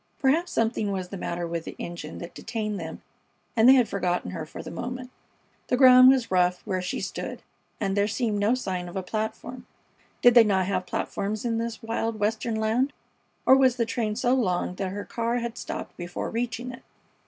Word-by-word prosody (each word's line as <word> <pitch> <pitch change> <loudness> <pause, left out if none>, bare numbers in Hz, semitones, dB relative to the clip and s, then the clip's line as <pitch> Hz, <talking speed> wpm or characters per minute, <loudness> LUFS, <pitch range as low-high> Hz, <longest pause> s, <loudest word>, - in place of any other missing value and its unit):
Perhaps 310 +6 +2
something 220 -2 0
was 185 -2 -3
the - - -6
matter 175 -2 -3
with 170 -1 -3
the - - -8
engine 170 -3 -6
that 170 - -8
detained 215 -3 -4
them 160 -1 -7 0.5
and 230 +2 +6
they 265 - +9
had 250 -4 +4
forgotten 180 -2 -1
her 165 -4 -5
for - - -8
the - - -8
moment. 250 +1 -5 0.6
The 250 - +1
ground 255 -1 +9
was 260 -5 +2
rough 180 -1 +2
where 185 -1 -1
she 180 - -3
stood, - - -5 0.4
and 195 - -1
there 205 0 +2
seemed 220 -1 -1
no 210 +5 +3
sign 185 -7 -3
of 175 - -11
a 190 - -2
platform. 220 +5 -4 0.6
Did 245 - +8
they 235 -1 +9
not 190 -3 +2
have 185 -1 -2
platforms 205 +4 -3
in 230 -1 0
this 230 -1 -4
wild 225 0 -2
Western 220 +2 0
land, 225 +6 +1 0.5
or 265 - +8
was 260 -2 +4
the 235 -2 0
train 225 -2 -2
so 245 +2 +2
long 185 -9 0
that 190 0 -3
her 200 +2 -5
car 235 0 -2
had 235 -1 -3
stopped - - -6
before 175 0 -5
reaching 240 +1 -3
it? 250 - -11
220 Hz, 200 wpm, -26 LUFS, 185-245 Hz, 0.6 s, they